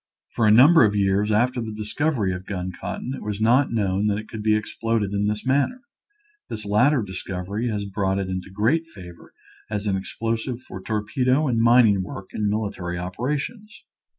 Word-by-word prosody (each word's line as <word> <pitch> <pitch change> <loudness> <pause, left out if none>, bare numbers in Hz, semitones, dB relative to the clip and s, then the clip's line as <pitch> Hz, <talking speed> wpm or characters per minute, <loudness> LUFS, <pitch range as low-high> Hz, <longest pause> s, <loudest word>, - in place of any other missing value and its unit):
For 115 -3 +1
a - - +6
number 135 +8 +7
of 105 -2 +2
years 100 +1 +2
after 120 +4 +2
the 110 -1 -5
discovery 110 0 -1
of 90 +1 -7
gun 95 -2 -3
cotton 125 +7 -5
it - - -7
was 105 -1 -4
not 120 +5 +3
known 100 -2 0
that 100 -1 +1
it 110 0 -7
could 110 - -7
be 110 0 +3
exploded 110 -1 -1
in 100 0 0
this 105 +2 -2
manner. 140 - +1 0.7
This 110 -1 -6
latter 120 +6 +3
discovery 95 +3 -4
has 105 -2 -2
brought 95 -1 -1
it 100 -1 -2
into 95 0 -4
great 120 - +1
favor 90 - -13 0.4
as 105 -1 -3
an 100 -2 +1
explosive 115 +5 -3
for 95 -7 -9
torpedo 125 +8 0
and 115 -3 +1
mining 115 -4 +5
work 95 +1 -8
in 105 -1 0
military 100 -5 -3
operations. 140 - -4
105 Hz, 180 wpm, -23 LUFS, 100-120 Hz, 0.7 s, number